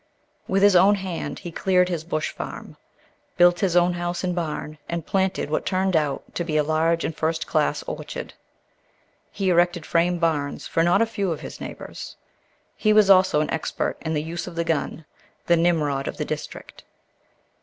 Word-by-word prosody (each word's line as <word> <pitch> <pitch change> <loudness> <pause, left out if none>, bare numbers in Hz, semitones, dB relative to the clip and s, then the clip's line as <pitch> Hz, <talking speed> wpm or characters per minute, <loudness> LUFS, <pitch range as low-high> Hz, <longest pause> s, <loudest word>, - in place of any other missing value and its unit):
With 195 +1 +1
his 205 -2 +6
own 195 +3 +6
hand 190 -4 -4
he 175 -3 -8
cleared 180 +1 +2
his 170 -3 -3
bush 155 -2 -2
farm, - - -8 0.6
built 175 0 +5
his 185 -4 +1
own 175 0 +4
house 175 0 -3
and 180 -1 0
barn, 155 -3 -4
and 170 -2 -3
planted 190 -5 0
what - - 0
turned 190 -1 0
out 150 -3 0
to 175 - -2
be 155 -2 -1
a 150 - +3
large 160 +2 +1
and 160 - -3
first 160 0 -1
class - - 0
orchard. - - -6 1.0
He 195 -2 -1
erected 175 -1 +2
frame 175 +1 +2
barns 155 -4 -1
for 165 - 0
not 175 +6 +4
a - - +2
few 205 -5 -2
of 160 - -4
his - - -9
neighbors. - - -8 0.6
He 215 -1 +2
was 210 -2 +6
also 185 -5 +5
an 155 - -2
expert 160 - -2
in 160 -1 -2
the 150 - -1
use 165 +2 -5
of 175 - -8
the 170 - 0
gun—the 165 +1 -2
Nimrod 150 -5 +1
of - - -5
the - - -2
district. - - -7
175 Hz, 185 wpm, -24 LUFS, 160-185 Hz, 1.0 s, his